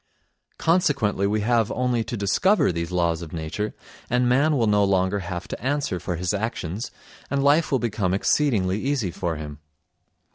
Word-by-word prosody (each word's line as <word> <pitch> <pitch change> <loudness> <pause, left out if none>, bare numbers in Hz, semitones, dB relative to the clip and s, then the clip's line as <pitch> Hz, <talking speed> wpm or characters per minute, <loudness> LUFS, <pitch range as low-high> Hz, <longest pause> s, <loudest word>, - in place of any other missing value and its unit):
Consequently 140 - +2
we 105 +1 0
have 115 0 +2
only 125 -2 0
to 120 - -4
discover 145 - +3
these 85 0 -4
laws 85 -2 +1
of 80 -3 -8
nature, 85 +6 -4 0.3
and 125 0 +2
man 140 +5 +3
will 115 - +2
no 105 -1 +3
longer 95 0 +1
have 90 -1 -5
to - - -7
answer 135 -9 -1
for 90 - -3
his 90 +2 -1
actions 100 -1 -3 0.4
and 140 0 0
life 150 +4 +3
will 135 - +4
become 110 -6 -1
exceedingly 100 -2 +1
easy 130 -9 -1
for 85 -1 -3
him. 75 -1 -7
105 Hz, 170 wpm, -24 LUFS, 90-125 Hz, 0.4 s, will